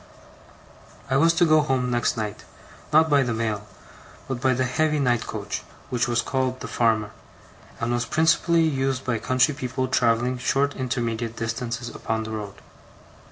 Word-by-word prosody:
I 135 - +4
was 165 +4 +5
to 175 - +4
go 155 -1 +5
home 130 -3 0
next 120 0 +1
night; 105 -2 -4 0.5
not 160 +1 +5
by 145 -3 +4
the 120 -3 -1
mail, 110 -2 -2 0.6
but 130 -2 -4
by 130 -1 +3
the 130 - +1
heavy 155 +4 +1
night 125 -5 +1
coach, - - -4 0.3
which 120 -1 +1
was 120 0 +1
called 130 -1 -1
the - - -5
Farmer, 110 -3 +1 0.7
and 115 +1 -1
was 120 0 0
principally 165 +1 +3
used 135 -3 0
by 120 -3 0
country 130 +7 +2
people 130 -1 -3
travelling 125 0 +1
short 140 +3 +1
intermediate 115 -3 -2
distances 120 +1 -3
upon 110 0 -3
the 110 - -6
road. 105 -2 -6
125 Hz, 160 wpm, -24 LUFS, 115-135 Hz, 0.7 s, was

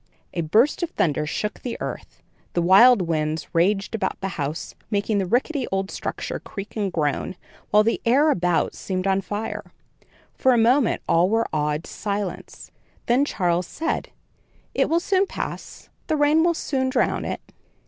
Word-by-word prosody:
A 170 - -1
burst 220 - +3
of 345 - -1
thunder 150 - 0
shook 210 +7 -3
the 245 - -4
earth; - - -7 0.3
the 175 - +1
wild 200 +4 +7
winds 155 -1 -1
raged 195 +5 +1
about 195 -4 -2
the 195 - -3
house, 155 -3 -4 0.2
making 205 0 0
the 190 - -1
rickety 260 - 0
old 195 0 -1
structure - - -4
creak 200 0 -8
and 205 -3 -1
groan, 155 +2 -1 0.3
while 210 0 +5
the 230 - 0
air 280 +6 +4
about 175 - +1
seemed 185 -1 -3
on 195 0 +2
fire. 205 +3 -5 0.6
For 260 - +3
a - - +3
moment 240 +3 +3
all 170 +2 +3
were 225 +2 +2
awed 150 0 0
to - - -11
silence; 200 -2 -5 0.3
then 250 +4 +3
Charles 175 - 0
said: 325 +1 -3 0.6
"It - - +1
will 330 +2 +3
soon 385 +2 +1
pass. - - -7 0.2
The 310 - +1
rain 295 +2 +4
will 340 0 +2
soon 265 -4 -1
drown - - +1
it." - - -6
205 Hz, 170 wpm, -23 LUFS, 175-255 Hz, 0.6 s, wild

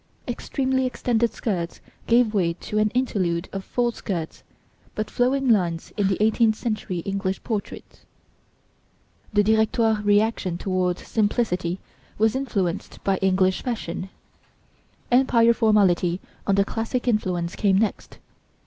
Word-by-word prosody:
Extremely 260 +1 -1
extended 235 -2 0
skirts 175 -6 -3 0.3
gave 235 -2 +4
way 175 -5 +1
to 210 +4 -3
an 215 0 +3
interlude 185 -9 0
of 195 -1 -4
full 240 +3 0
skirts, 175 -8 -5 0.5
but 215 0 -3
flowing 265 +2 +1
lines 175 -8 +1
in 205 -3 +1
the 195 - 0
eighteenth 220 0 +3
century 215 -7 -3
English 195 0 -3
portraits. 215 -4 -5 1.3
The 205 -1 +3
Directoire 220 0 +2
reaction 205 -3 +2
towards 185 -1 -1
simplicity 200 -5 0 0.4
was 220 +2 +2
influenced 200 -9 -2
by 195 -1 +1
English 190 0 +2
fashion. 190 -6 -4 1.0
Empire 240 -2 +5
formality 195 -6 +3 0.3
under 200 0 +4
classic 230 +4 -3
influence 180 -6 0
came 195 -3 +2
next. 215 +1 -2
210 Hz, 120 wpm, -24 LUFS, 185-230 Hz, 1.3 s, Empire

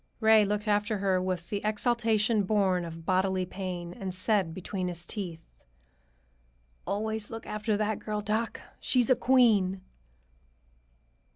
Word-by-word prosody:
Ray 220 -1 +6
looked 210 +1 -2
after 210 +1 +1
her 190 -2 +1
with 180 -2 -3
the 205 -1 -1
exaltation 220 0 +2
born 190 -3 +1
of 165 -1 -9
bodily 185 0 +1
pain 180 -2 -5
and 185 -1 -6
said 190 -2 +1
between 185 +1 -4
his 175 -1 -4
teeth, 175 -6 -5 1.4
"Always 220 +1 -2
look 225 0 -7
after 215 0 -1
that 210 0 -1
girl, 210 -1 -3
doc. 215 +2 -2 0.2
She's 250 -1 +2
a - - +7
queen!" 220 -7 +3
205 Hz, 130 wpm, -29 LUFS, 185-220 Hz, 1.4 s, a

